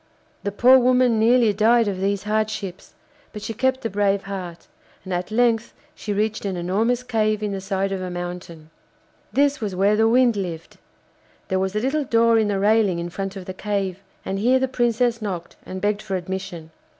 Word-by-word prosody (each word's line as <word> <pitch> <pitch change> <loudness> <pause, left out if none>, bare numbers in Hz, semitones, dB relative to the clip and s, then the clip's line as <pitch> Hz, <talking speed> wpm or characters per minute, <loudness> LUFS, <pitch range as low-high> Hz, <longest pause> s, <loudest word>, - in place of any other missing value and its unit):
The 200 - -2
poor 250 +6 +6
woman 250 -2 +3
nearly 230 -1 +4
died 225 +2 +3
of 190 -2 -3
these 200 0 0
hardships, 215 -3 -3 0.4
but 210 -2 -8
she 225 - -4
kept 260 +2 0
a - - 0
brave 200 0 +1
heart, 180 -4 -7 0.4
and 185 -1 -5
at 180 0 -2
length 230 0 +1 0.2
she 210 - -6
reached 215 +1 -1
an 195 -3 -3
enormous 220 +8 0
cave 215 -3 0
in 210 - -1
the 195 -1 -4
side 195 0 -2
of 190 -1 -3
a 185 - -4
mountain. 175 -3 -7 0.6
This 285 -1 +2
was 200 -4 -3
where 200 +3 +3
the 220 +1 +3
Wind 245 -1 +4
lived. 175 -5 -5 0.7
There 190 - +1
was 190 +1 -2
a - - +2
little 275 +6 0
door 230 -2 +3
in 215 - +1
the 205 -1 0
railing 205 -2 +3
in 170 0 -4
front 195 +2 -4
of 190 -2 -8
the 185 - -6
cave, 195 -2 -2 0.3
and 195 0 -2
here 250 +5 +4
the 265 0 0
Princess 240 -2 0
knocked 180 -5 -5
and 185 - -5
begged 205 +1 0
for 195 -3 -4
admission. 180 -3 -5
205 Hz, 200 wpm, -22 LUFS, 190-230 Hz, 0.7 s, poor